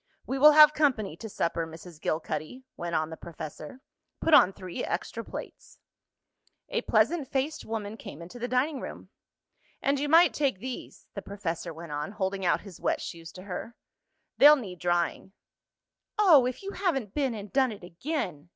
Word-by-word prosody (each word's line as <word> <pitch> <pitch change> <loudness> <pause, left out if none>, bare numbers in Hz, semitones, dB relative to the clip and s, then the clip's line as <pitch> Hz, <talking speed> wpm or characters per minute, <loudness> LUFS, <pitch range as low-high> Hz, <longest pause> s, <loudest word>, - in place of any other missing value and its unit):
"We 270 - -2
will 300 +2 +9
have 300 0 +9
company 255 - +1
to 220 - -7
supper, 170 -3 -1
Mrs. 160 0 -12
Gilcuddy," 155 - -3
went 170 -1 -4
on 155 0 0
the 160 - -7
professor. 155 - -9 0.4
"Put 325 - +1
on 190 - +8
three 185 -2 -6
extra - - -3
plates." - - -9 0.9
A - - -1
pleasant 330 -6 +2
faced 275 +3 -2
woman 220 -1 -4
came 145 - -9
into 175 +9 -10
the 245 - -2
dining 260 +4 0
room. - - -8 0.7
"And 275 0 +1
you 290 +1 -1
might 330 +1 +6
take 275 -8 0
these," 255 +5 -8
the 200 - -5
professor 170 -5 -4
went 165 0 -9
on, 150 +6 -4
holding 195 -1 -2
out 180 - +2
his 195 -5 -12
wet - - +1
shoes 165 0 -8
to 185 - -10
her. 205 +5 -6 0.6
"They'll 295 +1 +10
need 195 - -7
drying." 175 +2 -1 0.8
"Oh, 325 -12 +6
if 255 +9 -5
you 395 - -4
haven't 275 - -1
been 270 -5 0
and 205 -1 -8
done 265 -2 +3
it 205 -4 -10
again!" 175 - -4
210 Hz, 175 wpm, -28 LUFS, 170-275 Hz, 0.9 s, They'll